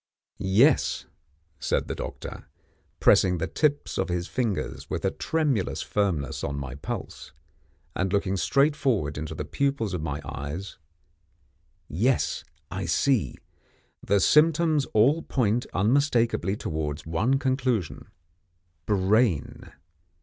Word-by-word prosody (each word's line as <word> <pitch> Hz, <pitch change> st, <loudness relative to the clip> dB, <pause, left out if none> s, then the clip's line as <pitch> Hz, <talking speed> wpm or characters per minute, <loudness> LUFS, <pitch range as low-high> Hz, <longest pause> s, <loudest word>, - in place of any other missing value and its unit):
"Yes," 115 Hz, +10 st, +3 dB, 0.5 s
said -, -, 0 dB
the -, -, -3 dB
doctor, -, -, -7 dB, 0.5 s
pressing 90 Hz, -1 st, +4 dB
the 80 Hz, -, -1 dB
tips 145 Hz, -1 st, 0 dB
of 95 Hz, 0 st, 0 dB
his 90 Hz, 0 st, -2 dB
fingers 80 Hz, -, -3 dB
with -, -, -3 dB
a -, -, +2 dB
tremulous 145 Hz, -, -1 dB
firmness 90 Hz, -10 st, -1 dB
on 70 Hz, -, -2 dB
my 70 Hz, -2 st, -5 dB
pulse, 70 Hz, -, -7 dB, 0.6 s
and 95 Hz, +1 st, -1 dB
looking 100 Hz, -1 st, +1 dB
straight 140 Hz, -, +2 dB
forward 105 Hz, -, 0 dB
into 75 Hz, +1 st, -5 dB
the -, -, -4 dB
pupils 140 Hz, -8 st, -1 dB
of 90 Hz, -, -2 dB
my 75 Hz, -2 st, -3 dB
eyes, 75 Hz, +9 st, -6 dB, 1.1 s
"yes, 115 Hz, -, 0 dB, 0.3 s
I 95 Hz, +2 st, -3 dB
see: 120 Hz, +7 st, +1 dB, 0.7 s
the 100 Hz, +1 st, +2 dB
symptoms 155 Hz, -, +4 dB
all 135 Hz, +10 st, +3 dB
point 120 Hz, -4 st, 0 dB
unmistakeably 115 Hz, -, +1 dB
towards 75 Hz, -3 st, -4 dB
one 110 Hz, +12 st, +1 dB
conclusion 130 Hz, -, -1 dB, 0.8 s
Brain. 100 Hz, -, +1 dB
100 Hz, 115 wpm, -26 LUFS, 85-135 Hz, 1.1 s, pressing